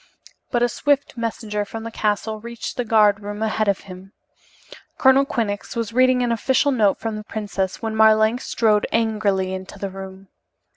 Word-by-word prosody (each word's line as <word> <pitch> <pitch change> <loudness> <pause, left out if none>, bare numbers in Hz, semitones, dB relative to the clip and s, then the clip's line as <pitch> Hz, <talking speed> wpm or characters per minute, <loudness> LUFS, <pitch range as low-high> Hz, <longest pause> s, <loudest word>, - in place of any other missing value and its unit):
But 240 -1 +1
a - - +4
swift 285 +3 0
messenger 220 -3 -3
from 220 +2 -7
the 230 - -6
castle 215 0 -1
reached 235 +1 -7
the 245 - -1
guard 215 -2 +4
room 205 +1 -5
ahead 220 0 0
of 200 -1 +1
him. 190 0 -12 0.8
Colonel 265 +1 +5
Quinnox 205 -6 -3
was 230 -1 -3
reading 255 0 +4
an 240 - 0
official 265 +5 +2
note 210 -7 +2
from 225 -2 -3
the 215 - -7
princess 205 -2 -4
when 220 -1 -2
Marlanx 220 +2 +4
strode 215 -2 +2
angrily 210 -4 0
into 190 +1 -7
the 195 0 -5
room. 190 0 -10
220 Hz, 175 wpm, -22 LUFS, 205-230 Hz, 0.8 s, Colonel